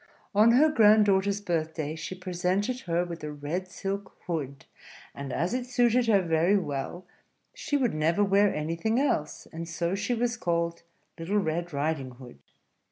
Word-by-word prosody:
On 215 +3 +6
her 285 +6 +6
grand 215 -6 +6
daughter's 200 0 +1
birthday 160 -4 -2
she 165 +3 -6
presented 185 +6 -1
her 175 -5 -1
with 170 -2 -8
a 150 - -4
red 150 +6 -4
silk 195 +1 -5
hood; 140 -6 -4 0.5
and 140 -1 -6
as 170 - -1
it 250 0 -2
suited 245 -1 +2
her 200 -4 +4
very 170 +4 +3
well, 155 +1 -4 0.5
she 290 - -1
would 250 -5 +1
never 160 +6 +2
wear 200 +1 +4
anything 165 +10 -1
else; 155 - -1
and 165 +1 -6
so 170 +1 -2
she 205 +5 -1
was 240 +1 -1
called 170 -3 -1 0.4
Little 180 +6 -1
Red 175 -2 -1
Riding 140 -3 -2
Hood. 120 - -13
180 Hz, 165 wpm, -27 LUFS, 160-205 Hz, 0.5 s, On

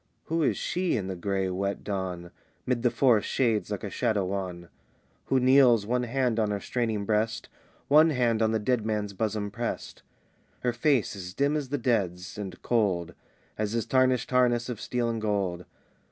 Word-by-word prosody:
Who 165 +1 -1
is 150 - +2
she 175 -3 0
in 100 - -3
the 95 0 -4
gray, 95 +1 -1
wet 100 +2 -2
dawn, 90 -3 -4 0.3
'Mid 125 -2 0
the 120 - +3
forest 120 -4 +3
shades 115 -6 +1
like 105 -3 -4
a 100 - -4
shadow 110 -5 0
wan? 90 -2 -4 0.6
Who 135 - +2
kneels, 125 -4 +5
one 125 +3 0
hand 120 -2 0
on 110 -1 +1
her 100 -1 -1
straining 110 -2 -2
breast, 110 +2 -1 0.4
One 155 +3 +6
hand 120 -6 +1
on 110 0 +3
the 110 - +2
dead 115 +1 0
man's 105 -2 -2
bosom 105 0 -2
pressed? 120 +2 -5 0.6
Her 125 -1 0
face 120 -3 +1
is 90 -1 -8
dim 140 +4 +1
as 145 -4 -2
the 145 - -1
dead's; 100 -7 -1
and 95 -3 -6
cold 100 -8 0 0.5
As 105 0 -1
his 115 -1 -1
tarnished 130 -2 +2
harness 125 -1 +2
of 115 -3 -5
steel 120 -1 -1
and 115 -1 -2
gold. 95 -5 -1
110 Hz, 180 wpm, -27 LUFS, 100-125 Hz, 0.6 s, One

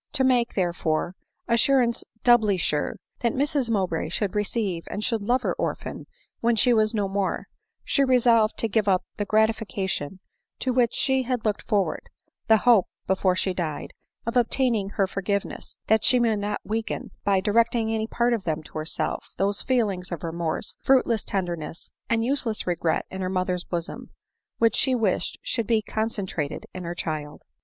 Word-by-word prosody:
To 265 - +2
make, 250 -2 +2
therefore, 175 -2 0 0.3
"assurance 240 0 +3 0.2
doubly 220 -5 +5
sure," 150 -4 0 0.2
that 235 -2 +1
Mrs 275 -2 0
Mowbray 185 -7 0
should 195 +3 -1
receive 210 -4 -1
and 210 - -4
should 225 -1 0
love 245 +5 +1
her - - +1
orphan - - -4 0.3
when 235 0 +2
she 245 +2 +4
was 215 0 +2
no 205 -2 +1
more, 195 0 -1 0.4
she 280 - +2
resolved 235 -4 +4
to 225 - +1
give 215 -1 +1
up 185 -2 +3
the 205 - -2
grati 220 +1 +4
fication 190 -6 -3 0.4
to 255 - -1
which 240 -2 +2
she 265 -1 +2
had 250 -2 -2
looked 210 -2 0
forward, 205 -4 -1 0.4
the 220 -1 +7
hope, 225 -4 +5 0.2
be - - +4
fore 185 -1 +2
she 185 0 0
died, 160 -5 -4 0.3
of 230 +2 -3
obtaining 240 -4 +2
her 200 -1 +1
forgiveness 195 +1 -3
— - - -59
that 220 -1 +3
she 250 -1 +5
might 225 -3 +2
not 205 0 -2
weaken, 220 +1 -3
by 195 -1 +3
directing 225 +2 +2
any 220 0 -1
part 235 +1 +1
of 225 -4 -1
them 160 -2 -2
to 155 - -7
herself, 155 +2 -3
those 200 +1 +1
feelings 205 -8 0
of 170 - -5
remorse, 165 -1 -3
fruitless 245 -5 +3
tenderness, 175 -4 -4 0.2
and 230 0 +2
useless 250 -4 -1
regret 170 -2 0
in 190 - -5
her 185 - -1
mother's 185 -1 -1
bosom, 170 -1 -5 0.5
which 230 -1 +3
she 260 -2 +3
wished 220 -6 0
should 230 -3 -2
be 230 -2 +3
concentrated 200 -10 -3
in 185 -1 -6
her 170 +1 -4
child. 150 -3 -4
210 Hz, 175 wpm, -25 LUFS, 185-235 Hz, 0.5 s, the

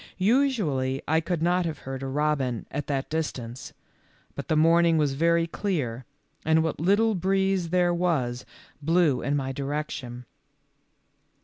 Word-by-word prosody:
Usually 190 - +1
I 160 +2 +2
could 170 -1 -2
not 180 +1 +2
have 160 - -4
heard 135 0 -5
a 135 - -4
robin 135 -4 -1
at 145 +1 -4
that 135 -2 -2
distance, 130 -6 -4 0.6
but - - -7
the 155 - +1
morning 165 +1 +4
was 145 -3 +1
very 165 +3 +2
clear, 145 - -3 0.4
and 160 +1 +3
what 160 - -2
little 205 +7 +3
breeze 190 -1 0
there 175 0 +2
was 150 -9 0 0.4
blew 160 -3 +2
in 140 - 0
my 135 -2 -2
direction. 135 -3 -5
160 Hz, 140 wpm, -26 LUFS, 135-175 Hz, 0.6 s, morning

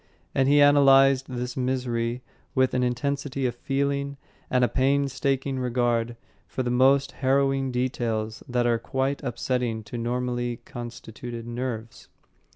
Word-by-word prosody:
And 135 0 +2
he 145 0 +6
analysed 135 -2 +6
this 125 -1 -4
misery 125 -2 -1 0.3
with 130 -1 +3
an 125 - +1
intensity 135 +2 -1
of 120 - 0
feeling 140 +2 -2 0.3
and 125 -1 +2
a - - +5
painstaking 135 +1 0
regard 120 -2 0 0.3
for 130 - -3
the 120 - -1
most 135 +2 +4
harrowing 135 0 +1
details 115 -3 -2
that 120 0 +1
are 120 -1 +2
quite 135 +3 -2
upsetting 120 -2 -2
to 115 +3 -6
normally 120 0 -2
constituted 120 0 -8
nerves. 120 -1 -5
125 Hz, 130 wpm, -26 LUFS, 120-135 Hz, 0.3 s, he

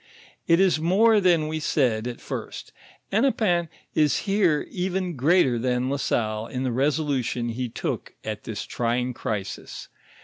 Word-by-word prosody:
It 170 +1 +5
is 190 -4 +4
more 205 +6 +4
than 170 -4 +3
we 155 0 -2
said 125 -7 +1
at 120 - -6
first: - - -7 0.4
Hennepin 200 -7 +2 0.2
is 150 +2 +2
here 195 -7 +2
even 180 -1 -2
greater 135 -3 +3
than 125 +1 0
La 140 - 0
Salle 110 -4 -1
in 130 +1 -4
the 130 - 0
resolution 135 -3 0
he 125 +2 -3
took - - -4
at - - -5
this - - -5
trying 125 +1 -1
crisis. 105 -6 -5
145 Hz, 145 wpm, -25 LUFS, 125-180 Hz, 0.4 s, It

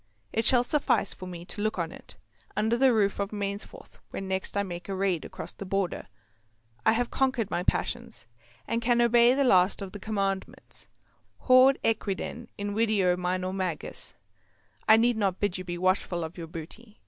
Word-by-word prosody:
It 225 0 0
shall 245 +1 +5
suffice 280 -6 +1
for 185 - -9
me 175 -1 -8
to 205 - -5
look 215 -1 -1
on 170 -2 -2
it, - - -12 0.4
under 220 +2 +2
the 260 +1 +5
roof 205 -4 +1
of 200 -1 -1
Mainsforth, 200 -1 -6
when 195 - -5
next 190 +1 -2
I 200 - +2
make 175 -1 -7
a 195 - -2
raid 190 -4 0
across 160 - -7
the - - -8
Border. 195 -1 -2 0.8
I - - +5
have 245 +1 -1
conquered 260 -6 0
my 175 - 0
passions, 180 - -2 0.4
and 230 - -1
can 240 0 +2
obey 240 +1 +5
the 280 - +2
last 185 -6 +4
of 195 -2 -6
the 205 - -8
Commandments. 195 -2 -4 0.5
Haud 255 +1 +6
equiden 225 +2 -2
invideo, 205 -3 +1
minor 185 +1 -2
magis. 185 -5 -3 0.7
I 220 - +9
need 235 0 +3
not 195 -4 0
bid 195 -3 0
you - - -5
be 175 -1 -5
watchful 185 -1 +1
of 160 +2 -6
your 170 -2 -7
booty. 185 +7 -10
200 Hz, 180 wpm, -28 LUFS, 185-230 Hz, 0.8 s, I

